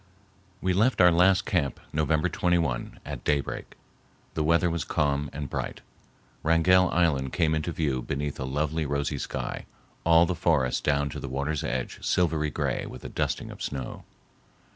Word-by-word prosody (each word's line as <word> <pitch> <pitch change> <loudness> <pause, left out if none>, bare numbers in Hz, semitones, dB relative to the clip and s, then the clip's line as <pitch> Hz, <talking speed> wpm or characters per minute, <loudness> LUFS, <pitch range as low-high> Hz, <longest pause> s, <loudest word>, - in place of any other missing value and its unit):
We 95 0 +1
left 110 +8 +2
our 90 -1 +7
last 90 +2 +4
camp 80 -8 0
November 80 +2 +2
21 85 -9 0
at - - -6
daybreak. 70 -1 -2 0.6
The 80 - 0
weather 85 +3 +3
was 85 -2 -1
calm 70 -3 0
and 75 0 -5
bright. - - -4 0.6
Wrangell 85 +3 +4
Island 70 -7 +1
came 80 -2 +2
into 80 +2 -1
view 70 -6 -1
beneath 70 +2 -3
a 65 - -2
lovely 75 +3 -1
rosy 70 0 -1
sky, - - -4 0.4
all 85 0 +6
the 90 - -1
forest 75 -7 +1
down 70 -1 +1
to - - -5
the 70 - -6
water's 70 +3 -2
edge 65 0 -3
silvery 80 -4 +1
gray - - -2
with 65 - -10
a - - -4
dusting - - -2
of - - -11
snow. 65 -3 -5
75 Hz, 165 wpm, -27 LUFS, 70-85 Hz, 0.6 s, our